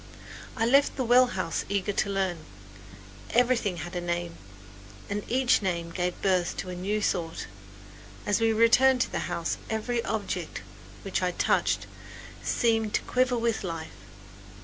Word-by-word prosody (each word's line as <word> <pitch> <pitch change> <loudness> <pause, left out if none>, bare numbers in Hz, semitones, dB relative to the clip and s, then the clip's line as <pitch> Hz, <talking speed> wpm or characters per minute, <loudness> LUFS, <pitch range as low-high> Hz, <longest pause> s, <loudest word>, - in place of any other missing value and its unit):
I 225 - +2
left 275 +4 +4
the 265 - -1
well 250 +1 +6
house 185 -7 -2
eager 200 0 0
to 200 - 0
learn. 190 -3 0 0.9
Everything 235 -6 +2
had 175 +3 -6
a 175 - -1
name, 175 -1 -3 0.8
and 205 +1 -1
each 255 -1 +3
name 170 -3 -2
gave 180 +1 -2
birth 185 -3 +1
to 185 - -4
a - - -5
new 200 +4 -1
thought. 165 -4 -1 0.8
As 205 +2 +1
we 225 0 +4
returned 250 +4 +5
to - - 0
the - - -3
house 165 -1 -2
every 230 +2 -1
object 195 -5 -3 0.4
which 195 -1 -2
I 180 - +2
touched - - +1 0.6
seemed 225 -2 +1
to - - +1
quiver 255 0 +1
with 230 -2 0
life. 165 -3 -5
200 Hz, 150 wpm, -27 LUFS, 180-235 Hz, 0.9 s, well